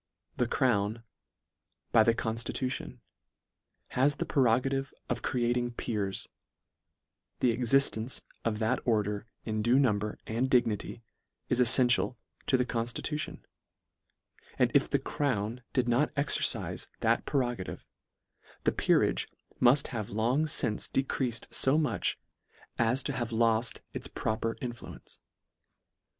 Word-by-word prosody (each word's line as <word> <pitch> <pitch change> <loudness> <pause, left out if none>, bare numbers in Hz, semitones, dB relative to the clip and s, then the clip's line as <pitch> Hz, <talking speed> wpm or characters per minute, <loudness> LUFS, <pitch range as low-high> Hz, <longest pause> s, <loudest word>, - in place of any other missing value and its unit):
The 125 - +1
crown, 115 -3 +1 0.9
by 115 - +6
the 115 +1 +4
constitu 115 +3 -2
tion, - - -6 0.9
has 140 +3 +2
the - - -3
prerogative 135 +1 +1 0.2
of 120 -1 -1
creating 120 0 0
peers; 105 -5 -2 1.1
the 125 - +3
existence 120 0 +2 0.2
of 110 -2 0
that 115 +4 +1
order 105 -2 0 0.2
in 110 -1 -1
due 120 +4 +4
number 105 -6 +1
and 120 +4 -1
dignity, 115 -2 +1 0.5
is 125 - +2
elfential 125 +1 +4 0.3
to 130 - +4
the 125 - +1
conftitution; 120 +6 -3 1.2
and - - +3
if - - +3
the - - +3
crown 120 -4 -2
did 125 -2 +1
not 120 +5 +2
exercife 140 0 -1
that - - +1
pre 135 -3 +2
rogative, 120 -6 -5 0.8
the - - +3
peerage - - +2 0.3
mull 125 +3 +6
have 110 -5 -4
long 120 +9 +1
fince 110 -7 +1
decreafed 130 -3 -1
lb 135 +4 +3
much, 135 -10 0 0.6
as 120 +3 +2
to - - -2
have 120 -2 -3
loll 115 0 +3 0.3
its - - -5
proper 110 +1 -2
influence. 120 -2 -8
120 Hz, 120 wpm, -30 LUFS, 110-130 Hz, 1.2 s, by